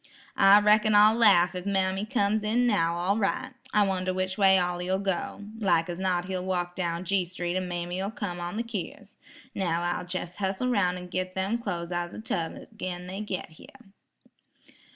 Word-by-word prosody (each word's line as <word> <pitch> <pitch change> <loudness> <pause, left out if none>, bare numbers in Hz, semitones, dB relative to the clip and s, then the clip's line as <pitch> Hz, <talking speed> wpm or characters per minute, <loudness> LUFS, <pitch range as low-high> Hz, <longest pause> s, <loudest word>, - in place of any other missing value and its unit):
"I 195 +1 +7
reckon 210 0 +4
I'll 210 +1 +7
laugh 200 -7 +5
if 180 +1 -6
mammy 190 +1 0
comes 215 -3 +1
in 230 +4 +2
now 170 -8 +2
all 185 +5 0
right. 255 +5 -1 0.2
I 210 - +4
wonder 185 -1 -1
which 185 0 -1
way 195 -1 +5
Ollie 180 0 -1
'll 190 - +2
go? 195 +1 -3 0.2
Like 180 -5 +2
as 175 0 -5
not 180 -2 0
he'll 185 -1 -3
walk 180 -1 -2
down 170 -1 -2
G 195 0 +1
street 175 0 -4
an' 185 -1 -1
mammy'll 175 +2 -3
come 200 -6 -5
on 175 +4 -4
the 230 - -1
keers. 210 -1 -7 0.4
Now, 170 -3 -1
I'll 175 +1 -2
jes' 180 -1 -4
hussle 195 +5 -1
roun' 180 -5 +1
an' 180 0 -9
git 185 0 -3
them 195 +5 -1
clo's 175 -6 -4
out 175 0 -2
o' - - -16
the - - -7
tub 175 -7 -3 0.2
agin' 180 -4 -5
they 190 +3 -6
git 195 -4 -4
here." 245 - -17
190 Hz, 195 wpm, -27 LUFS, 175-205 Hz, 0.4 s, I